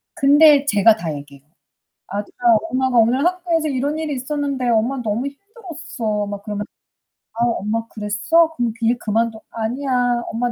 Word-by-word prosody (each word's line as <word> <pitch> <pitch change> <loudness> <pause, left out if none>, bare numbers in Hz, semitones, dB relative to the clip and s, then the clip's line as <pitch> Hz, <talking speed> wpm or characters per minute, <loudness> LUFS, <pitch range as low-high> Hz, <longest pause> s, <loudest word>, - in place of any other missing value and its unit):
근데 290 -1 +6
제가 215 -2 +4
다 165 -7 -4
얘기해요. 140 -1 -11 0.6
"아들아 205 +1 -6 0.3
엄마가 260 -1 0
오늘 245 +7 +3
학교에서 350 -3 0
이런 285 +2 -1
일이 310 -2 -3
있었는데 275 -1 -2
엄마 235 +4 +1
너무 230 +4 -2
힘들었어." 295 - -5
막 200 0 -6
그러면 210 -1 -4 0.7
"아 235 +1 +1
엄마 225 -1 -1
그랬어? 225 +12 +1
그럼 235 -2 -1
그 230 - -2
일 240 +2 +2
그만둬." 225 0 -1
"아니야, 245 +1 -1
엄마 240 +2 -1
245 Hz, 335 characters per minute, -20 LUFS, 220-285 Hz, 0.7 s, 근데